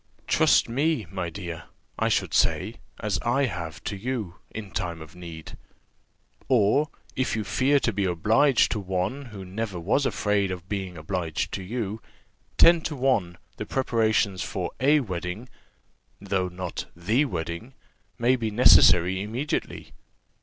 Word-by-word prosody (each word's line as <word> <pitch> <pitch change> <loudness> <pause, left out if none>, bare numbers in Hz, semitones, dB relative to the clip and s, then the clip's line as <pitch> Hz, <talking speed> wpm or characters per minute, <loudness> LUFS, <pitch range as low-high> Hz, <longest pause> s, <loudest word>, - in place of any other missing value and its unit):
Trust - - +4
me, 140 +1 0
my 90 -3 -3
dear, 85 -2 -7 0.3
I - - +2
should - - 0
say, 110 +5 +1 0.2
as 105 -4 -1
I 125 +4 +2
have 85 - -5
to 105 - -3
you, 105 -4 -4
in 105 -3 -8
time 85 -2 -3
of 80 +2 -12
need. 85 -3 -9 0.9
Or, 130 +4 +3 0.3
if 130 -3 0
you 110 - -1
fear 140 +6 +2
to 115 - 0
be 100 0 0
obliged 110 - +3
to 110 - -1
one 95 +8 -2
who 100 -6 -9
never 95 0 -4
was 110 +11 +1
afraid 105 -2 0
of 90 -1 -6
being 95 -3 -4
obliged 80 0 -3
to 95 - -4
you, 110 +1 -4 0.6
ten 170 0 +7
to 155 - -4
one 120 -10 +1 0.2
the 105 - -4
preparations 110 -6 +1
for - - -3
a 145 +4 +4
wedding, 90 +1 -5 0.7
though 95 -2 -1
not 90 -1 -5
the 110 - +1
wedding, 85 - -5 0.4
may 125 +1 +3
be 115 -3 -2
necessary 95 -5 +6
immediately. 120 +8 -4
105 Hz, 145 wpm, -26 LUFS, 90-125 Hz, 0.9 s, ten